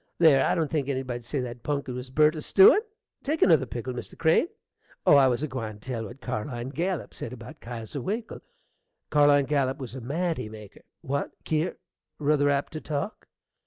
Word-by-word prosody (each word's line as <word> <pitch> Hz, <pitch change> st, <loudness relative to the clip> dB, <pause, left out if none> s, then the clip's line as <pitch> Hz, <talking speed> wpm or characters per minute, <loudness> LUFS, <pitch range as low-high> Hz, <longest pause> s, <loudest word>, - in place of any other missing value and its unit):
There, 155 Hz, -5 st, +6 dB
I -, -, +2 dB
don't 160 Hz, -3 st, -1 dB
think 145 Hz, -4 st, -1 dB
anybody'd 130 Hz, -3 st, -3 dB
say 135 Hz, +3 st, -2 dB
that 120 Hz, -1 st, -6 dB
punkin 140 Hz, -2 st, -2 dB
was 125 Hz, +1 st, -6 dB
burnt 150 Hz, +4 st, +4 dB
a 155 Hz, -, -4 dB
stewin! 195 Hz, -, +7 dB, 0.4 s
Take 305 Hz, +3 st, +1 dB
another 155 Hz, -8 st, +5 dB
pickle, 125 Hz, +2 st, -5 dB
Mr. 125 Hz, -, -8 dB
Crane. 160 Hz, -, +3 dB, 0.6 s
Oh, -, -, +7 dB
I 135 Hz, -2 st, +7 dB
was 125 Hz, +2 st, 0 dB
a -, -, 0 dB
gwine 115 Hz, -6 st, -5 dB
to -, -, -16 dB
tell 115 Hz, 0 st, -4 dB
what 120 Hz, +6 st, -11 dB
Carline 120 Hz, +2 st, -4 dB
Gallup 175 Hz, +5 st, -2 dB
said 115 Hz, -, -6 dB
about 125 Hz, +6 st, -11 dB
Kesier 115 Hz, +3 st, -6 dB
Winkle. 220 Hz, -, -4 dB, 0.7 s
Carline 145 Hz, -2 st, +5 dB
Gallup 135 Hz, -2 st, +1 dB
was 125 Hz, -4 st, -7 dB
a 130 Hz, -, -6 dB
manty 160 Hz, 0 st, -2 dB
maker 105 Hz, -2 st, -12 dB, 0.2 s
What, 140 Hz, +2 st, -2 dB
Kier? 160 Hz, +3 st, 0 dB, 0.4 s
ruther 145 Hz, -1 st, +2 dB
apt 140 Hz, +1 st, 0 dB
to 155 Hz, -, -5 dB
talk? 155 Hz, +9 st, -4 dB
140 Hz, 190 wpm, -27 LUFS, 125-155 Hz, 0.7 s, stewin